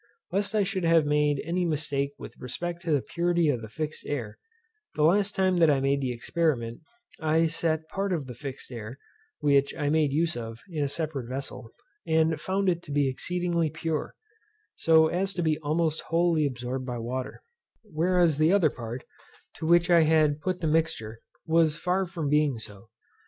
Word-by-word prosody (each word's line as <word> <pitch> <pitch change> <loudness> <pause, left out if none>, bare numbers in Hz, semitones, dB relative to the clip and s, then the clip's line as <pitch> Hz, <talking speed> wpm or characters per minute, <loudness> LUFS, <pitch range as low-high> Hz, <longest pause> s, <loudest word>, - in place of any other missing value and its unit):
Lest 200 +3 0
I 210 - +4
should 190 -1 -2
have 165 -2 +4
made 150 -1 +1
any 175 +2 0
mistake 145 -3 -1
with - - -10
respect 170 +7 -4
to 170 -2 -3
the 145 -4 +2
purity 170 -2 +1
of 125 -5 0
the 110 - -8
fixed 155 +5 -4
air, 120 -8 -4 0.6
the 150 - +1
last 195 +5 +3
time 185 -1 +2
that 165 -2 +5
I 140 -2 +3
made 140 +1 +1
the 130 -2 -1
experiment, 120 -2 -1 0.4
I 160 +1 +2
set 160 -1 0
part 195 +2 -2
of 160 -6 -1
the 125 - -8
fixed 135 +1 -8
air, 115 +1 -7 0.4
which 140 -1 +3
I 145 -2 0
made 155 -2 +2
use 160 +3 +1
of, 115 -1 -6
in 155 -3 -1
a - - +1
separate 140 -4 -4
vessel, 130 -2 -6 0.4
and 160 0 +2
found 195 +1 -1
it 170 -2 +1
to - - -8
be 145 -1 +2
exceedingly 170 +4 -1
pure, 155 0 -3 0.6
so 160 -1 +5
as 190 +4 -1
to 175 - -1
be 155 -1 +1
almost 160 +1 0
wholly 165 -2 +2
absorbed 130 0 -4
by 125 -1 -3
water; 125 +3 -5 0.4
whereas 175 -4 +2
the 155 +2 +4
other 185 -7 +4
part, 120 +1 -7 0.5
to 160 - -4
which 170 +1 +4
I 170 -1 +7
had 155 -2 +3
put 185 0 -2
the 160 - 0
mixture, 150 -9 -1 0.2
was 160 -1 +3
far 185 +2 0
from 170 -4 -4
being 150 -3 +2
so. 110 -1 -9
155 Hz, 185 wpm, -27 LUFS, 140-170 Hz, 0.6 s, I